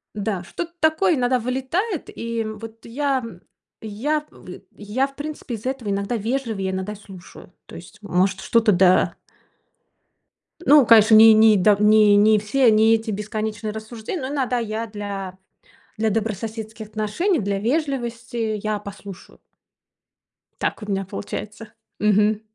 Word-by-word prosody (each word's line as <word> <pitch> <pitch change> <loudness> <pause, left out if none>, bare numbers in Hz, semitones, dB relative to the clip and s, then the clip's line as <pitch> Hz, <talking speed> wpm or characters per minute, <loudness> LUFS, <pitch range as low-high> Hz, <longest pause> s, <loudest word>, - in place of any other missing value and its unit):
Да, 200 -3 -3
что-то 340 - -6
такое 320 +3 +2
иногда 250 -1 +1
вылетает. 265 - -3
И, 230 0 -3
м, 215 -1 -6
вот 225 0 -11
я 265 +1 -1 0.6
я 275 +9 -2
в - - -15 0.3
я 215 +6 -1
в 275 - -19
принципе 295 -3 -7
из-за 225 +5 -4
этого 265 -6 -5
иногда 200 +3 -2
вежливее, 220 -4 -2
иногда 190 +3 -4
слушаю. 190 -3 -14
То - - -12
есть, 175 - -13
может, 190 -1 0
что-то, 225 -2 +2
да 185 0 +3 1.5
Ну, 290 -3 +7
конечно, 220 -1 +6
ни 220 +1 +9
ни 215 0 +6
да, 205 +2 +4
не 210 0 +5
не 210 +1 +5
все, 230 +3 +3
не 220 +1 +5
эти 220 0 -4
бесконечные 215 +1 -4
рассуждения, 220 - -6
но 260 - -4
иногда 265 -3 -1
я 225 0 -3
для 200 -3 -6 0.6
для 220 0 0
добрососедских 220 +1 -4
отношений, 215 - -1
для 200 -1 -2
вежливости 235 -4 -2
я 215 -1 -1
послушаю. 200 -2 -11 1.2
Так - - -2
у 210 - -8
меня 195 -1 -1
получается. 210 +3 -7 0.3
Мгм. 210 0 +2
220 Hz, 140 wpm, -22 LUFS, 205-245 Hz, 1.5 s, ни